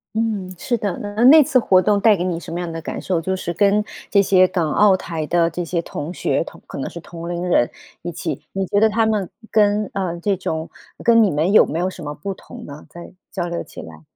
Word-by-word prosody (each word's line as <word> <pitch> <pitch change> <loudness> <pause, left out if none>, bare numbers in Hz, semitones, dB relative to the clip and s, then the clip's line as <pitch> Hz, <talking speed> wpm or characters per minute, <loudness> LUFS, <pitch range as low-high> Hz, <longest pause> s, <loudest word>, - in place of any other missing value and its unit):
嗯， 215 -5 -2
是 240 +7 -1
的。 205 -4 -3
那- 205 +2 -2
那 300 +5 +9
次 275 -2 +2
活 190 -6 +4
动 205 +1 +2
带 215 -2 +5
给 175 - -2
你 180 -2 -1
什 170 - -9
么 170 - -3
样 175 -1 -4
的 165 0 -6
感 - - -5
受， 180 -3 -1
就 190 +3 -2
是 185 -2 -3
跟 200 +3 +3 0.3
这 200 - +4
些 185 -1 +5
港 175 -4 -1
澳 205 -2 +5
台 165 -4 -4
的 170 0 +2
这 175 +2 -4
些 170 0 -2
同 160 0 -6
学 - - 0
同 - - -13
可 - - -8
能 135 - -4
是 170 - -9
同 170 0 -9
龄 175 0 -3
人 120 -8 +3 0.3
一 175 - -5
起， 160 -4 -4
你 195 0 -2
觉 205 +2 -1
得 220 - +5
他 225 +1 +1
们 210 -4 0 0.2
跟， 210 -1 +2
呃， 180 -3 -3
这 200 +3 0
种 160 -3 -4 0.3
跟 230 -1 +5
你 200 - +2
们 160 +7 +1
有 - - +7
没 160 - -3
有 180 +2 0
什 185 - -11
么 145 0 -5
不 195 +7 -5
同 - - -12
呢？ 145 +1 -10
在 175 0 -11 0.2
交 175 -3 -3
流 170 0 -4
起 - - -13
来。 80 -1 -12
185 Hz, 270 characters per minute, -20 LUFS, 170-205 Hz, 0.3 s, 那